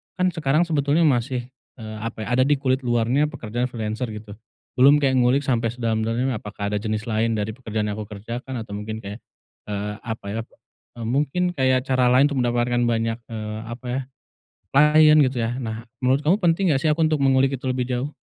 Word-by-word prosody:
kan 185 0 +1
sekarang 155 -1 +1
sebetulnya 150 +1 +2
masih, 125 -2 +1 0.3
eee, 110 -2 -8
apa 115 -1 -5
ya 120 - -1
ada 130 - +6
di 145 - +4
kulit 130 -1 +1
luarnya 120 +5 +2
pekerjaan 120 +3 -3
freelancer 110 +1 -3
gitu 105 -1 -10 0.5
belum 140 +3 +7
kayak 130 -2 +2
ngulik 125 +3 +3
sampai 115 -3 +1
sedalam-dalamnya 115 +1 -1
apakah 105 -1 -5
ada 105 - 0
jenis 110 +1 -3
lain 110 0 0
dari 105 +1 -2
pekerjaan 110 -4 -3
yang 100 - -5
aku 105 - -6
kerjakan 120 +5 -6
atau 105 - -14
mungkin 110 +1 -5
kayak, 100 +4 -7 0.5
eee, 105 0 -3
apa 110 -2 -5
ya, 115 +2 -2 0.6
eee, - - -4
mungkin 150 +8 0
kayak 130 -1 +2
cara 130 -1 +3
lain 130 +3 +6
untuk 135 - -1
mendapatkan 120 0 +1
banyak, 115 0 0
eee, 110 -1 -5
apa 120 +2 -8
ya, 130 - -1 0.7
klien 150 +2 +6
gitu 130 -1 -1
ya, 120 +3 -2
nah 115 -1 -5 0.2
menurut 130 +3 +3
kamu 175 +7 +3
penting 175 0 +2
gak 135 - +1
sih - - +2
aku 165 +2 +1
untuk 155 -2 +1
mengulik 135 0 +3
itu - - -10
lebih 130 -1 0
jauh? 130 +4 -2
125 Hz, 195 wpm, -23 LUFS, 110-135 Hz, 0.7 s, belum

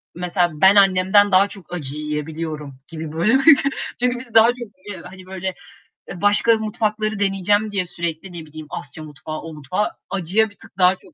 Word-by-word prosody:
mesela 175 0 0
ben 190 +1 +7
annemden 195 +1 +5
daha 190 +2 +5
çok 195 -3 -11
acı 145 -5 -5
yiyebiliyorum 150 -1 -5
gibi, 160 -2 -7
böyle, 180 +11 +3 0.6
çünkü 245 0 0
biz 245 -2 -10
daha 225 0 +8
çok 245 +1 0 0.3
yiye 205 - -7
hani, 185 -1 -12
böyle, 190 0 -4 0.6
e 175 - -8
başka 210 +3 +4
mutfakları 215 -1 -2
deneyeceğim 205 +2 +1
diye 200 -3 -1
sürekli 170 +1 -5
ne 165 -2 -8
bileyim 155 0 -10
Asya 150 +2 -7
mutfağı, 155 +1 -7
o 165 - -9
mutfağı; 155 +8 -2 0.2
acıya 195 +4 +1
bir 205 - -20
tık - - -17
daha 185 0 +5
çok - - -20
185 Hz, 180 wpm, -21 LUFS, 160-205 Hz, 0.6 s, daha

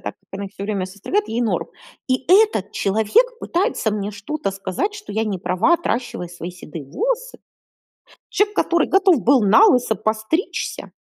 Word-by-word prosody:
так - - -5
как 195 - -42
она 200 +1 -5
их 195 - -13
всё 200 - -8
время 200 -3 -2
состригает- 205 - -2
ей 235 +2 -1
норм. 225 - -1 0.4
И 255 0 0
этот 370 - +4
человек 220 - +2
пытается 355 - 0
мне 205 -1 -3
что-то 205 +5 -4
сказать, 195 - -3
что 415 - -9
я 220 +2 0
не 205 -4 -2
права, 185 - +2
отращивая 240 - -3
свои 170 0 -7
седые 165 -4 -9
волосы? - - -3 0.9
Человек, 415 0 +1
который 340 -1 +2
готов 380 - +4
был 260 -1 +4
налысо 245 - +5
постричься? 220 - -2
225 Hz, 165 wpm, -21 LUFS, -, 0.9 s, налысо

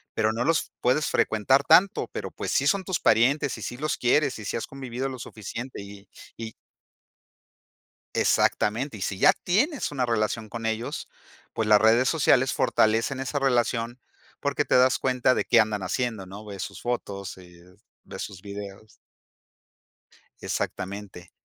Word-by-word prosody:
pero 110 +1 +1
no 115 +2 -1
los 165 +3 +1
puedes 130 +5 +2
frecuentar 130 +6 +2
tanto, 180 +7 +4
pero - - -5
pues - - -5
sí - - +2
son 200 -2 +2
tus 185 -2 -2
parientes 130 +5 +3
y - - -10
sí 120 - -5
los 155 +3 -2
quieres 135 +1 +2
y 105 - -8
sí - - -2
has 115 - -4
convivido 130 -1 -5
lo 130 -2 -7
suficiente 115 +2 -7
y 100 0 -12 0.3
y. 110 -1 -7 1.6
Exactamente, 115 +5 +1
y - - -11
si 95 - -2
ya - - +6
tienes 255 - 0
una 130 -3 0
relación 110 -1 -1
con 115 0 -5
ellos, 110 +1 -3 0.4
pues 110 - -1
las 105 -1 +6
redes 115 +4 +4
sociales 135 -5 +3
fortalecen 115 +4 +2
esa 135 +2 -2
relación 120 -2 0 0.4
porque - - -1
te - - +2
das 130 +1 +4
cuenta 130 -1 +2
de - - -1
qué 120 - +5
andan 105 -2 +1
haciendo, 105 +1 -2
¿no? 100 +3 -10
Ves 100 -2 -7
sus - - -6
fotos, 100 -5 -4
eh, 90 0 -17 0.3
ves - - -8
sus 95 -3 -7
videos. 100 +1 -9 1.5
Exactamente, 95 -2 -5
115 Hz, 160 wpm, -26 LUFS, 105-130 Hz, 1.6 s, ya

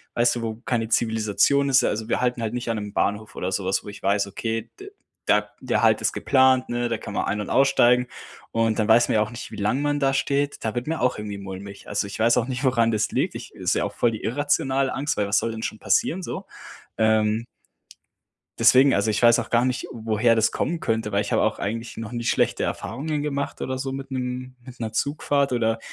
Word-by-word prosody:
weißt 120 +1 +3
du, - - -4
wo 110 -1 -3
keine 115 -3 -1
Zivilisation 115 +6 +2
ist? 135 -1 +5
Ja - - +1
also 110 +1 -3
wir - - 0
halten 125 -1 0
halt 110 +1 -2
nicht 120 -1 -3
an 115 - 0
'nem 105 -1 -6
Bahnhof 105 +1 -1
oder 90 - -3
so 95 - -1
was 95 - 0
wo - - -13
ich 100 - -10
weiß: 100 +1 +1
„Okay, 115 +3 -4
d 400 +1 -10 0.4
da - - +2
der - - 0
Halt - - +4
ist - - 0
geplant, 130 -1 +3
ne, 120 0 -1
da 115 - -1
kann 100 - -8
man - - -1
ein 105 +2 -1
und - - -6
aussteigen.“ 125 -2 +4 0.4
Und 115 -1 +1
dann 110 - +1
weiß 115 +2 +5
man - - 0
ja 105 - +4
auch 105 - -1
nicht, 120 - -8
wie - - -7
lange 105 +6 0
man 145 0 0
da 135 -1 +2
steht. 140 +1 0
Da 110 - -1
wird 120 +4 -3
mir 165 0 -2
auch 125 -2 +1
irgendwie 105 -1 -5
mulmig. 100 0 -9
Also, 100 0 -1
ich 100 - -7
weiß 115 +1 +4
auch 120 - +1
nicht, 130 +1 -4
woran 120 -3 +3
das 105 -1 0
liegt. - - -1
Ich - - -8
ist - - -1
ja - - +1
auch - - -5
voll 120 - +2
die 110 - -7
irrationale 135 +1 0
Angst, 145 +2 -2
weil 105 -1 0
was 105 - +2
soll 115 - 0
denn 110 0 -6
schon 110 - -3
passieren, 190 -6 +1
so. - - -5 0.5
Ähm 110 +1 +2 1.1
Deswegen, 130 +4 +6
also 100 +2 +1
ich 110 - 0
weiß 120 0 +6
auch - - -5
gar 120 0 +3
nicht, 130 -1 -2
woher 115 0 +1
das 110 - +2
kommen 165 +2 -2
könnte, 110 -2 -1
weil 100 +1 +1
ich - - -5
habe - - +2
auch - - +1
eigentlich 115 +4 -4
noch 115 0 -6
nicht 120 -1 -2
schlechte - - +1
Erfahrungen 145 +5 -3
gemacht 140 -1 -3
oder 130 0 -2
so 135 0 -3
mit 135 0 -7
'nem 130 0 -4
mit 125 -2 -12
'ner 110 -2 -3
Zugfahrt 140 +1 0
oder, 115 -1 +1
115 Hz, 245 wpm, -24 LUFS, 110-130 Hz, 1.1 s, Deswegen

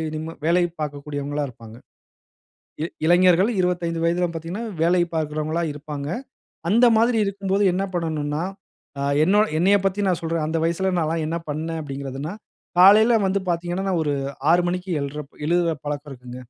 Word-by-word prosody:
நிம்மா 160 +1 -5
வேலை 175 +2 +3 0.2
பார்க்கக்கூடியவங்களா 145 0 -3
இருப்பாங்க. 115 -2 -13 1.1
இ - - +1 0.2
இளைஞர்கள் 180 +4 +5
25 170 -2 -1
வயதிலாம் 170 0 +1
பார்த்தீங்கனா, 170 +8 -5 0.2
வேலை 175 +1 +4
பார்க்கிறவங்களா 155 +1 -1
இருப்பாங்க. 145 -1 -6 0.6
அந்த 235 +4 +5
மாதிரி 230 0 +3
இருக்கும்போது 200 0 0
என்ன 190 +2 0
பண்ணனும்னா, 155 -2 -2 0.6
ஆ - - -1 0.2
என்னோட 205 +4 +4
என்னையப் 195 +3 +3
பத்தி 200 +2 0
நான் 180 -1 0
சொல்றேன், 165 -1 -1
அந்த 165 +1 -1
வயசில 185 +3 0
நால்லாம் 160 0 -1
என்ன 165 +2 -2
பண்ணேன் 160 +2 -3
அப்படின்கிறதுனா, 140 +4 -5 0.5
காலையில 220 +4 +7
வந்து 195 +1 +1
பார்த்தீங்கனா 175 +3 -2
நான் 170 -3 +1
ஒரு 145 -1 0 0.4
6 175 0 +4
மணிக்கு 180 +1 -3
எழ்ற 145 +1 -5 0.2
எழுற 170 -1 +2
பழக்கம் 145 0 -4
இருக்குங்க. 125 -1 -10
165 Hz, 145 wpm, -23 LUFS, 150-185 Hz, 1.1 s, காலையில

